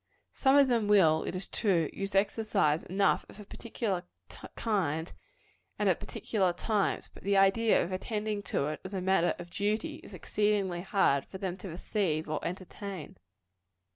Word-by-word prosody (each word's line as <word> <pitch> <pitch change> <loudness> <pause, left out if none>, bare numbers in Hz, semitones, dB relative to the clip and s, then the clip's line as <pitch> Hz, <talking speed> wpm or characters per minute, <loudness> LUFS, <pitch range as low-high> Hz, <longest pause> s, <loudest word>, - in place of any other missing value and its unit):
Some 270 0 +3
of 280 -1 +6
them 230 -4 +1
will, 165 -7 +5
it - - -4
is 185 - -4
true, 175 -8 +1
use 195 0 -4
exercise 195 -6 +2
enough 195 +2 +1
of - - -14
a 210 - -9
particular 210 -3 -3 0.5
kind, 170 -7 -1 0.6
and - - +1
at - - +3
particular 190 -5 -1
times; 205 +2 -1
but - - -13
the 200 0 +1
idea 195 +3 +4
of 170 - -5
attending 210 +2 -2
to - - 0
it 155 - -5
as 190 +1 -6
a - - -1
matter 185 -2 +2
of 175 0 -10
duty, 210 +3 -1
is - - -12
exceedingly 205 -4 0
hard 180 -8 +2
for - - -8
them 185 -2 -3
to 195 - -8
receive 170 -2 -1
or 155 -1 -3
entertain. 185 -1 -6
195 Hz, 170 wpm, -30 LUFS, 175-210 Hz, 0.6 s, of